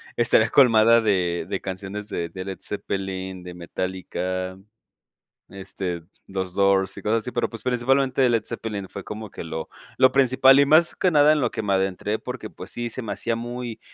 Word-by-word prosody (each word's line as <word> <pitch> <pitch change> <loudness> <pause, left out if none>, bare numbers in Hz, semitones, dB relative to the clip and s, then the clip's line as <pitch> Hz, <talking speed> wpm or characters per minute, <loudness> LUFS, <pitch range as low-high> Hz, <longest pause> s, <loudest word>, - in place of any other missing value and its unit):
estaría 115 -1 +3
colmada 115 -3 +6
de 90 -6 0
de - - -2
canciones 100 +2 -6
de 85 -5 -3
de 95 +1 -7
Led 95 -1 -6
Zeppelin, 95 -2 -4
de 90 0 -8
Metallica, 95 +1 -4 0.9
este, 95 -3 -5 0.2
los 95 -2 -4
Doors 95 -1 +2
y - - -7
cosas 110 +2 +1
así, 125 - -3
pero 120 - -1
pues 115 - -9
principalmente 130 +1 +2
Led 115 -2 +1
Zeppelin 105 -4 -4
fue 100 - -7
como 105 -1 -7
que - - -7
lo 80 -1 -5 0.3
lo 130 0 +6
principal 135 0 +5
y 140 - +5
más 160 +4 +5
que 185 - +2
nada 150 -1 +5
en 155 - +2
lo 120 - +1
que - - -5
me 100 -1 0
adentré 95 +3 -1
porque 125 -4 -7
pues 90 - -10
sí 120 -1 -3
se 130 - -4
me 110 - -4
hacía 115 - -1
muy 120 0 -6
105 Hz, 190 wpm, -24 LUFS, 95-120 Hz, 0.9 s, colmada